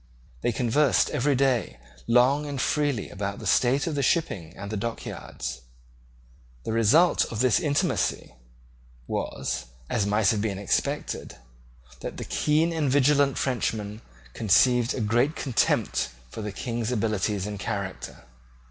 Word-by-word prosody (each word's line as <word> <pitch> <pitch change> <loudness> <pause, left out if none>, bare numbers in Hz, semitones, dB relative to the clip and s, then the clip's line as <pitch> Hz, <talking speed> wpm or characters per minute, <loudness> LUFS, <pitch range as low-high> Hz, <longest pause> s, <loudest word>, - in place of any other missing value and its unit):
They 120 - +1
conversed 125 +4 +2
every 145 0 +1
day 130 - +1 0.3
long 130 +5 +4
and 140 -2 -4
freely 145 -7 0
about 100 0 -4
the - - -9
state 130 +3 +3
of 165 - -2
the 145 - 0
shipping 100 - -1
and 100 +1 -7
the - - -2
dock 115 +3 -4
yards. - - -6 1.0
The - - -3
result 115 - +4
of 115 - -6
this 125 -4 +4
intimacy 145 - 0 0.7
was, - - -3 0.3
as 105 -3 +1
might 105 -1 +3
have 105 - -1
been 105 -3 -2
expected, 100 0 -2 0.6
that - - -6
the - - -5
keen 155 +3 +1
and 155 -4 0
vigilant 140 0 +3
Frenchman 110 -4 -2 0.3
conceived 120 +3 +3
a 125 - -2
great 120 +8 +2
contempt 115 - 0 0.2
for - - -6
the 105 -1 -4
King's 115 +3 -3
abilities 105 -4 0
and 105 -1 -5
character. 100 -4 -5
120 Hz, 140 wpm, -26 LUFS, 105-140 Hz, 1.0 s, long